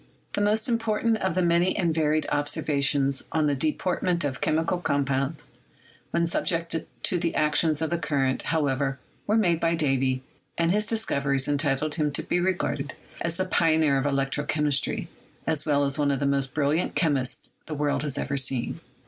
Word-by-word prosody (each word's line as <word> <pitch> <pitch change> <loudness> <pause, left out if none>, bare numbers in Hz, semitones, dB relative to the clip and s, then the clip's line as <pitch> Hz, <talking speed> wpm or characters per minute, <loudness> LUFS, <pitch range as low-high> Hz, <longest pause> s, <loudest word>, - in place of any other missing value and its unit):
The - - -1
most 215 +1 +2
important 230 -1 +1
of 190 -5 -1
the 185 - +2
many 175 +2 +2
and 170 -5 +1
varied 155 -1 +1
observations 140 -1 +2
on 155 -1 +1
the 145 - +2
deportment 170 +4 0
of 135 -3 -3
chemical 165 +3 +1
compounds 140 -1 -1 0.7
when 170 0 +1
subjected 165 -1 -1 0.2
to 180 - +2
the 170 -1 -1
action 155 +2 +3
of 160 0 -2
the 170 - 0
current, 135 -5 0
however, 140 -3 0 0.3
were 215 +2 +3
made 175 -7 +2
by 170 0 +1
Davy, 135 -4 0 0.3
and 170 0 +2
his 210 +2 +1
discoveries 140 - -1
entitle 145 0 0
him 150 -1 0
to - - 0
be 175 - 0
re 185 +1 +2
garded 145 -5 -3 0.3
as 170 0 -1
the 185 - -1
pioneer 160 -6 +3
of 135 - -2
electrochemistry, 145 0 +1 0.4
as 155 -2 0
well 145 -1 +3
as 140 +2 -1
one 145 -1 +2
of 140 -2 0
the 140 - 0
most 140 -2 0
brilliant 150 +3 0
chemists 135 -6 0 0.2
the 155 - -4
world 145 0 0
has 145 -3 -2
ever 140 0 -2
seen. 130 -2 -1
150 Hz, 175 wpm, -26 LUFS, 140-170 Hz, 0.7 s, action